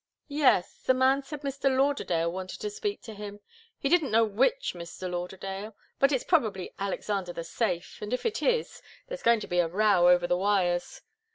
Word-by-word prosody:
"Yes. 275 -11 +2
The 260 - +3
man 260 +2 +3
said 290 +1 -8
Mr. 275 -1 0
Lauderdale 180 -12 +1
wanted 185 +1 -6
to 420 - -3
speak 415 -1 -4
to 225 - -8
him 205 0 -8 0.4
he - - -2
didn't 325 -1 +3
know 225 +1 +4
which 260 - +1
Mr. 175 +1 -7
Lauderdale 190 +4 -5 0.2
but 275 +1 +4
it's 260 -3 +1
probably 220 - 0
Alexander 195 -2 -2
the 170 - -5
Safe, 175 0 -2
and 210 +1 -5
if 250 - -2
it 450 -1 -1
is, 480 -2 0 0.3
there's - - -6
going 235 -2 +4
to - - -6
be 175 - 0
a 175 - +3
row 185 -1 +4
over 175 0 +5
the 175 - +1
wires. 185 -3 0
210 Hz, 190 wpm, -28 LUFS, 180-275 Hz, 0.4 s, over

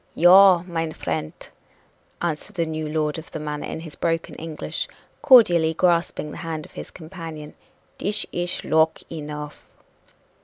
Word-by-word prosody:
"Yaw, 180 +1 +7
mine 165 -3 -3
frient!" 80 - -5 0.7
answered 170 +5 -3
the 170 -2 0
new 155 -1 -4
lord 155 0 -1
of 160 - -12
the - - -6
manor 150 -1 -4
in 160 - -5
his 160 -2 -9
broken 165 0 -1
English, 160 -1 -5 0.3
cordially 175 - +6
grasping 170 -3 +1
the - - -8
hand 160 -2 -5
of - - -16
his - - -8
companion, 160 -3 -9 0.5
"dish 205 +1 0
ish 175 0 -2
loke 160 0 +3
enough!" 150 -2 -8
160 Hz, 145 wpm, -23 LUFS, 155-175 Hz, 0.7 s, Yaw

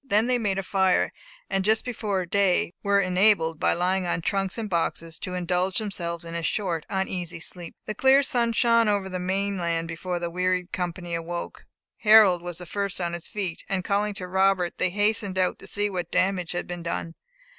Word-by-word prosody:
Then 220 -4 +2
they 250 0 +1
made 200 -4 0
a 195 - -1
fire; 190 -1 +2 0.4
and 195 0 0
just 220 +2 +2
before 210 -6 -2
day 185 -1 +2
were 200 0 +3
enabled, 180 -4 +3
by - - +3
lying 180 +1 0
on 175 - 0
trunks 195 +3 -1
and 225 -2 -3
boxes, 165 -2 -2
to 180 - -5
indulge 180 +1 0
themselves 170 -6 -3
in 165 - -7
a 170 - -2
short 170 -2 -2
uneasy 180 -3 -3
sleep. 170 +1 -5
The 215 - -3
clear 265 +5 +5
sun 235 -3 +1
shone 230 -1 +4
over 200 -2 +1
the 185 -1 -4
main 195 +2 -1
land 165 -1 -1
before 175 +2 -4
the 170 0 -3
wearied 180 0 0
company 175 -1 -4
awoke. 170 +1 -5 0.3
Harold 210 -5 +6
was 175 -1 -6
the 180 - -7
first 200 +1 -3
on 170 -1 -2
his 170 -1 -5
feet, 190 -5 -4
and 190 -2 0
calling 205 +1 0
to 180 -2 -5
Robert, 190 -1 +1
they 185 - +3
hastened 205 0 0
out 185 -1 +1
to - - -11
see 205 0 0
what 180 -4 -4
damage 185 -2 0
had 175 - -2
been 175 -1 -6
done. 170 0 -4
185 Hz, 200 wpm, -25 LUFS, 175-200 Hz, 0.4 s, Harold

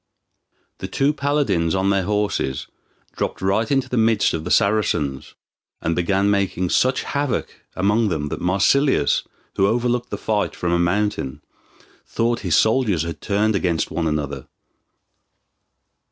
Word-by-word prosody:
The - - -5
two 140 +2 +1
paladins 140 - 0
on 95 +1 +1
their 95 -2 +1
horses 105 -10 -1 0.5
dropped - - -3
right 100 +4 0
into 135 -2 +1
the 125 - -2
midst 110 -2 +3
of 80 - -3
the - - -3
Saracens, 80 -11 +1 0.4
and 85 0 -1
began 95 +3 +1
making 95 -3 0
such 130 +1 +2
havoc 140 -2 -2 0.2
among 105 +4 +2
them 75 -4 -2
that - - -5
Marsilius, 100 - +2 0.4
who 95 - +4
overlooked 120 +2 0
the - - -4
fight 105 -2 -1
from 85 - -2
a 85 - +2
mountain, 85 -6 -1 0.6
thought 115 +1 0
his 90 -6 0
soldiers 110 - +2
had 80 -2 -6
turned 105 +1 +1
against 85 -4 0
one 85 -1 -1
another. 70 -3 -3
100 Hz, 140 wpm, -21 LUFS, 85-115 Hz, 0.6 s, who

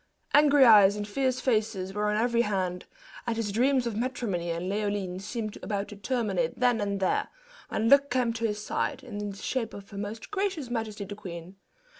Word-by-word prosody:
Angry 290 -2 +6
eyes 205 -4 +8
and 205 0 -4
fierce 255 +4 0
faces 215 -6 0
were 210 +1 0
on 210 - +1
every 235 +1 +2
hand, 185 -4 -1 0.4
and 230 -1 -1
his 220 -3 -1
dreams 255 +4 +2
of 235 -3 -2
matrimony 220 -8 -2
and 170 +2 -2
Leoline 200 -2 -2
seemed 215 +1 -5
about 200 -2 -3
to 210 - -8
terminate 200 -6 -1
then 245 -3 +3
and 200 -1 -1
there, 190 - +1 0.4
when 220 - 0
luck 280 +2 +6
came 245 -2 +1
to 230 0 -1
his 210 -1 -3
side, 265 +5 -2
in 210 -4 -5
the 200 - -8
shape 230 +1 -3
of 200 +1 -11
her 200 - -6
most 210 - -6
gracious 380 -10 -2
majesty 220 -3 -3
the 205 - -7
queen. 185 -2 -9
215 Hz, 195 wpm, -28 LUFS, 200-245 Hz, 0.4 s, eyes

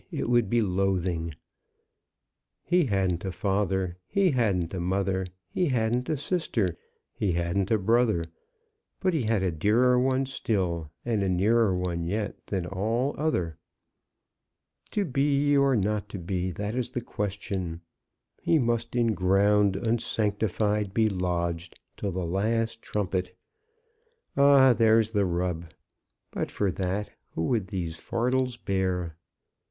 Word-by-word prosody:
it - - -2
would 120 -4 +3
be 120 +1 +3
loathing! 90 -4 0 1.3
He 175 -1 +3
hadn't 95 -6 0
a 95 - -2
father; 95 -2 -1
he 195 -3 +2
hadn't 100 - +1
a 95 - -2
mother; 95 +1 0 0.2
he 180 - 0
hadn't 125 -1 0
a 155 - +1
sister; 130 - -1 0.4
he 95 -4 0
hadn't 85 +3 0
a 110 - +4
brother; 110 -3 +2 0.7
but 185 -1 +1
he 160 - +1
had 110 -4 +1
a 90 - +1
dearer 115 +10 +3
one 130 +1 +2
still, 90 - -2 0.2
and 115 -4 0
a 95 - +1
nearer 100 +2 +3
one 90 -2 -2
yet, 100 +5 -3
than 95 -4 -2
all 110 +9 -1
other. 90 - -1 1.3
'To 205 -2 0
be 145 0 +2
or 140 -1 +4
not 105 0 0
to 100 - -6
be; 90 +1 -2
that 105 +4 -4
is 125 -1 -1
the 125 - -3
question.' 95 -6 -4 0.6
He 165 - +3
must 115 -3 0
in 115 -2 +2
ground 100 +1 +3
unsanctified 105 -2 0
be 110 -1 +4
lodged, 85 -2 -2 0.2
till 100 - -3
the 90 0 -3
last 110 +6 0
trumpet! 95 -3 -2 1.0
Ah, 140 -2 +7
there's 110 -1 +4
the 100 -2 +2
rub! 90 -1 -1 0.7
But - - -3
for 100 -2 0
that, 95 +3 -2 0.2
who 80 - -1
would 110 -6 0
these 85 -5 -4
fardels 125 +4 -1
bear?" 95 -5 -1
100 Hz, 135 wpm, -27 LUFS, 90-120 Hz, 1.3 s, Ah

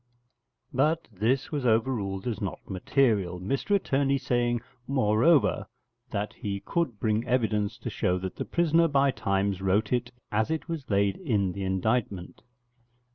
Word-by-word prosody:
But 155 +5 +1
this 115 +7 0
was 145 -3 -2
overruled 110 -5 0
as 115 -4 -3
not 95 -3 -5
material, 100 -2 +1
Mr 135 - 0
Attorney 140 -7 +1
saying, 120 -2 0 0.3
moreover, 135 +4 +3 0.4
that 105 -1 -3
he 100 -1 -4
could 150 -11 -2
bring 110 0 +1
evidence 110 -5 0
to - - -6
show 90 - 0
that 95 0 -5
the - - -3
prisoner 170 0 +3
by 140 -2 +3
times 100 -3 -1
wrote 95 +5 +1
it 120 0 -1 0.2
as 110 +1 +1
it 160 0 -2
was 160 -6 -5
laid 100 -1 +2
in 105 - 0
the 100 +2 -5
indictment. 95 0 -1
110 Hz, 145 wpm, -27 LUFS, 100-135 Hz, 0.4 s, moreover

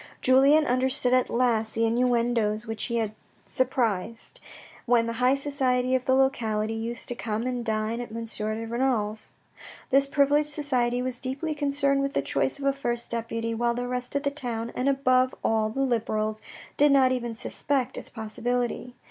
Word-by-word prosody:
Julien 275 +4 +5
understood 255 0 +2
at 255 -1 +3
last 230 -3 +1
the 230 0 +2
inuendoes 235 -2 +1
which 225 -2 -3
he 235 - -3
had 220 -2 -1 0.3
surprised, 230 - -1 0.5
when 235 -1 +4
the 230 - -3
high 255 +2 +4
society 260 -3 0
of 255 -1 +1
the 260 - +3
locality 225 -5 +1
used 230 +1 -3
to - - 0
come 225 -2 -3
and 250 -1 -2
dine 220 +1 -1
at 240 - -8
M. 230 +1 -5
de 220 0 -4
Renal's. 225 -3 -1 0.6
This 275 +1 +5
privileged 290 +1 +2
society 250 -5 0
was 255 -1 -2
deeply 270 +5 -2
concerned 280 -1 +1
with 275 0 -2
the - - +1
choice - - 0
of 280 - -6
a 275 - +3
first 240 -3 -3
deputy, 230 0 -3
while 235 +1 0
the 245 0 -3
rest 250 +1 -4
of 280 - 0
the 280 - 0
town, 235 -5 -3
and 255 +2 0
above 255 -2 +2
all, 220 -1 +1
the 270 +5 -3
Liberals, 215 -4 -1 0.4
did 290 0 +5
not 265 -2 +5
even 240 -2 -2
suspect 260 +2 0
its - - -5
possibility. 245 +2 -3
245 Hz, 175 wpm, -26 LUFS, 230-265 Hz, 0.6 s, Julien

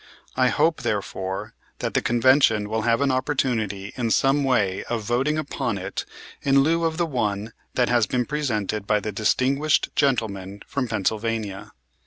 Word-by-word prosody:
I - - +3
hope, - - +2
therefore, 95 0 -3 0.2
that - - -3
the - - +2
Convention 120 -3 +3
will 110 +1 -1
have 115 +3 +2
an 140 -1 +2
opportunity 115 -7 -1
in 120 -2 -1
some 135 +5 +3
way 105 -8 +1
of 115 -2 -3
voting 130 +7 0
upon 155 -2 -2
it - - -4 0.4
in 140 0 +4
lieu 165 +3 +2
of 160 -1 -1
the 170 - +1
one 110 -6 -2 0.2
that 125 -1 +2
has 120 -2 +3
been 125 -1 0
presented 110 -9 -2
by 105 -1 +3
the 105 +1 -4
distinguished 135 +8 +1
gentleman 100 -8 -1
from 135 -3 -2
Pennsylvania. 110 -1 -2
115 Hz, 160 wpm, -24 LUFS, 105-135 Hz, 0.4 s, in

